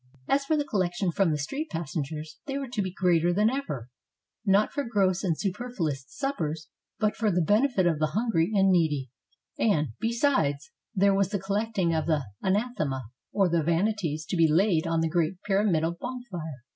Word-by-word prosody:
As 275 0 +2
for 310 +2 +2
the 290 - 0
collections 185 -5 0
from 165 -5 +2
street 275 - -4
passengers, 155 -1 -4
they 275 0 -2
were 275 -2 -4
to 235 -4 -1
be 185 -2 -2
greater 175 -2 +2
than 210 +5 +3
ever, 200 - -4 0.3
— - - -61 0.2
not 200 +1 +3
for 285 - -2
gross 195 -6 +1
and 170 -5 0
superfluous 185 - -3
suppers, 160 - -3 0.3
but 215 -1 +1
for 220 -1 +1
the 180 -2 +1
benefit 210 - +3
of 165 -3 +2
the 155 - +2
hungry 220 -8 +2
and 195 -2 +4
needy; 150 -8 +1 0.5
and, 155 - +2
besides, 225 - +1 0.2
there 200 +1 +4
was 195 -1 +2
the 205 - -1
col 195 +1 -2
lecting 210 -6 0
of 160 -1 0
the 155 -4 +1 0.2
Anathema, 190 - 0 0.3
or 195 -2 +3
the 170 -1 +2
Vanities 165 -1 0
to 185 - -3
be 165 -3 +4
laid 170 -1 +3
on 165 0 +1
the 165 - +2
great 170 +2 0
pyramidal 185 -5 +1
bonfire. 175 - -6
185 Hz, 185 wpm, -27 LUFS, 160-215 Hz, 0.5 s, and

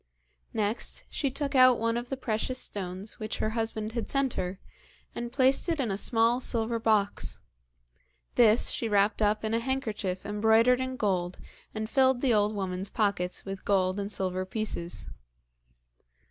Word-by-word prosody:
Next, 215 +1 -1
she 280 - -1
took 280 +1 -3
out 255 -2 +7
one 230 +1 0
of 240 +1 -4
the 270 - -3
precious 255 +1 -2
stones 195 -2 -3
which 215 -1 -4
her 215 - -1
husband 220 -1 -2
had 230 -1 -4
sent 275 -2 +1
her, 185 +1 -3 0.5
and 240 0 -5
placed 265 +5 +3
it 330 -2 0
in 240 -6 0
a - - 0
small 230 +3 +3
silver 230 -2 -1
box. 215 -3 +1 1.0
This 225 -1 +4
she 230 - -2
wrapped 205 +1 +2
up 210 +1 +2
in 220 - -1
a 230 - +2
handkerchief 220 -7 -3
embroidered 220 +4 +3
in 260 0 -3
gold, 185 -6 -1 0.4
and 215 0 -3
filled 260 0 +3
the 260 -4 +3
old 210 0 +2
woman's 190 0 -3
pockets 200 -5 -1
with 195 -1 -6
gold 190 -1 +1
and 200 +1 -3
silver 185 -2 -1
pieces. 190 -3 -4
220 Hz, 160 wpm, -28 LUFS, 200-245 Hz, 1.0 s, out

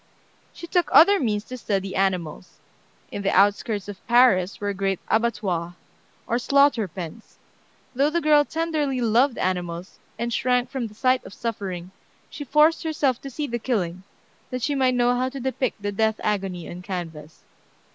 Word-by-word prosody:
She - - -9
took 345 0 +1
other 400 +5 +7
means 210 -5 -1
to 255 +2 -8
study 195 -3 -2
animals. 185 -3 -2 0.5
In 205 - -4
the 195 - 0
outskirts 205 +1 +2
of 205 -2 -10
Paris 235 -6 +4
were 205 0 -2
great 195 -1 -1
abattoirs, 195 -7 0 0.5
or 235 - 0
slaughter 275 -4 +3
pens. 180 +5 -9 0.6
Though 275 +3 +2
the 340 +2 0
girl 300 -2 +5
tenderly 310 -4 -1
loved 240 +3 +2
animals, 180 -1 -3 0.2
and 235 0 -2
shrank 250 +1 +1
from 260 -4 -3
the 210 - -15
sight 255 +2 +2
of - - -11
suffering, 190 -6 -5 0.4
she 290 - -6
forced 300 +4 +3
herself 295 -6 0
to 275 - -7
see 295 +3 -4
the 240 -3 -3
killing, 185 -8 -2 0.5
that 255 -1 -4
she 290 - +1
might 260 -2 +2
know 245 0 +3
how 255 +1 0
to 275 +1 -7
depict 255 -4 -2
the 205 - -1
death 220 +1 0
agony 195 -4 -2
on 175 - -8
canvas. 165 -5 -7
230 Hz, 165 wpm, -24 LUFS, 190-265 Hz, 0.6 s, other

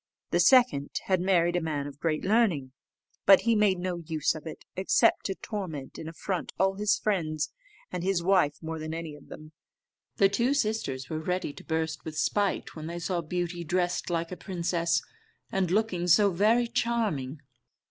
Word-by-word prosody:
The - - +2
second 245 - +5
had 185 -2 +1
married 175 -2 +2
a 175 - +1
man 150 -3 -2
of 145 0 -9
great 155 -1 -1
learning; 190 - +2 0.6
but 195 -1 +8
he 230 - +2
made 210 -3 +3
no 180 0 -3
use 160 -3 0
of 155 0 -9
it, 160 - -9
except 190 +1 +3
to 195 - -3
torment 170 -13 -6
and 160 - -6
affront 180 +2 -4
all 190 +1 +3
his 205 +1 +1
friends, 155 -7 -1 0.4
and 175 - -3
his 185 -2 +1
wife 180 -6 +3
more 160 0 -4
than 155 +1 -4
any 165 -2 -5
of 145 - -16
them. 155 0 -11 0.6
The 195 - +5
two 235 +8 +1
sisters 210 - -1
were 155 - -3
ready 180 -2 -2
to - - -12
burst 160 -1 -2
with 155 -1 -7
spite 200 +5 0
when 155 -1 -6
they 170 +1 -5
saw 175 0 -2
Beauty 175 +1 -3
dressed 175 +2 -1
like 170 0 -1
a 180 - -5
princess, 170 -2 -1 0.5
and 190 -2 0
looking 185 -3 0
so 200 +3 +5
very 215 +7 +3
charming. 220 - -1
175 Hz, 180 wpm, -28 LUFS, 160-195 Hz, 0.6 s, but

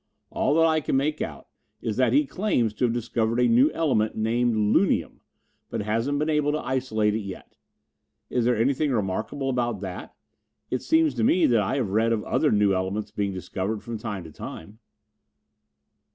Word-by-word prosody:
"All 145 - +1
that 165 0 +5
I 160 -1 +2
can 135 - 0
make 150 +3 -1
out - - -4 0.4
of - - -24
it - - -2
is 105 - -3
that 130 -3 +3
he 145 +4 +4
claims 135 - 0
to 125 - 0
have 120 - +1
discovered 115 0 -1
a 125 - +4
new 120 +5 +5
element 130 -10 0
named 115 +2 +1
'lunium,' 110 - +1 0.5
but - - -3
hasn't 115 +7 0
been 150 +2 0
able 150 -2 +1
to - - +1
isolate 120 -5 0
it 110 - -1
yet. 100 -3 -9 0.7
Is 125 - 0
there 120 -1 +2
anything 135 +5 +1
remarkable 110 +5 -2
about 120 -5 -1
that? 95 -3 -7 0.6
It 130 - -1
seems 160 +2 +3
to 120 -3 -1
me 175 +10 +4
that 115 -3 +3
I 105 +6 -1
have 120 -8 -1
read 110 +3 +2
of 110 - -1
other - - +1
new 105 -2 +3
elements 95 +3 -2
being 100 -1 -2
discovered 95 +3 -4
from 115 -2 -5
time 105 -5 -5
to 80 - -11
time." 100 +8 -9
115 Hz, 195 wpm, -25 LUFS, 105-135 Hz, 0.7 s, that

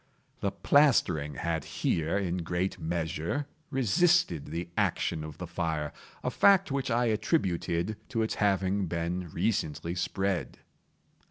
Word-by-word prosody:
The - - 0
plastering 115 - +3
had 80 -2 -2
here, 80 +3 0
in 90 -3 -1
great 90 +2 -2
measure, 80 - -2 0.2
resisted 135 - +2
the 85 +2 -4
action 80 - 0
of 80 -1 -8
the 90 - -5
fire—a 80 -3 -4
fact 195 -5 +5
which 135 -1 -1
I 120 +1 +2
attributed 105 - 0
to 115 -4 0
its 110 - -1
having 100 -1 +2
been 85 +1 -2
recently 85 -3 -1
spread. 95 +1 -1
90 Hz, 120 wpm, -29 LUFS, 85-110 Hz, 0.2 s, fact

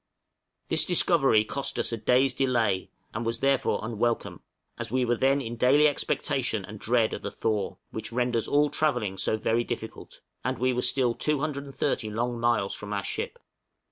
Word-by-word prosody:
This - - +4
discovery 135 -11 +4
cost 140 +4 -3
us - - -1
a 115 - -2
day's 125 +4 +3
delay, 115 -8 +1 0.2
and 115 - -3
was 115 0 -1
therefore 135 -1 +1
unwelcome, 115 +1 -2 0.4
as 120 0 -4
we 130 +2 +1
were 120 0 +2
then 135 +3 +2
in 120 -2 -5
daily 140 +5 +5
expectation 125 -6 -1
and 105 +2 -10
dread 115 0 +2
of - - -5
the - - -3
thaw, 105 -3 -2
which 110 - -5
renders 120 -1 0
all 145 0 +3
travelling 120 -11 0
so 110 - 0
very 115 +2 +1
difficult; 115 -2 -7 0.2
and - - -1
we 130 +1 +1
were 125 - 0
still 125 -3 +2
230 140 -4 -2
long 120 +3 -2
miles 115 -4 +1
from 105 0 -6
our 100 -1 -2
ship. - - -4
120 Hz, 170 wpm, -27 LUFS, 110-135 Hz, 0.4 s, daily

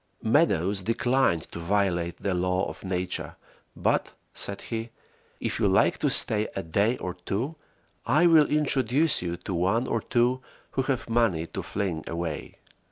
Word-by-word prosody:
Meadows 100 - +2
declined 115 -4 +1
to - - -6
violate 85 -2 0
the 100 - -2
laws 90 +1 0
of - - -10
Nature, 90 -1 -3 0.4
but, - - 0 0.2
said 100 - -1
he, 115 0 -4 0.5
"If - - -3
you - - +3
like - - +3
to - - +2
stay 105 0 +4
a 95 - -3
day 100 +9 +1
or 90 - -4
two 100 - -3 0.5
I 150 +8 +3
will 160 -3 +6
introduce 145 0 +1
you 85 -1 -3
to 90 +2 -6
one 95 +8 +1
or 115 -3 -1
two 125 +3 +1 0.3
who 135 - 0
have 130 -2 -2
money 115 -9 +1
to - - -6
fling 95 -6 -3
away." 85 -2 -4
100 Hz, 160 wpm, -27 LUFS, 90-125 Hz, 0.5 s, will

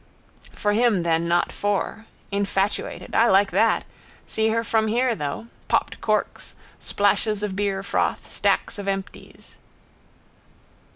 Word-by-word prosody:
For 205 -1 0
him 220 -5 +3
then 165 0 +1
not 175 +1 +2
for. 205 +2 -2 0.2
Infatuated. 200 0 -1
I 230 - +5
like 195 0 +4
that? - - +2 0.4
See 220 0 0
her 230 +1 +1
from 220 -1 +1
here 240 +3 +2
though. 150 +2 -4 0.2
Popped - - 0
corks, - - -1 0.2
splashes 205 +1 0
of 200 -2 -2
beerfroth, 200 -1 -1
stacks - - 0
of 200 - -6
empties. 195 0 -6
205 Hz, 120 wpm, -24 LUFS, 195-220 Hz, 0.4 s, I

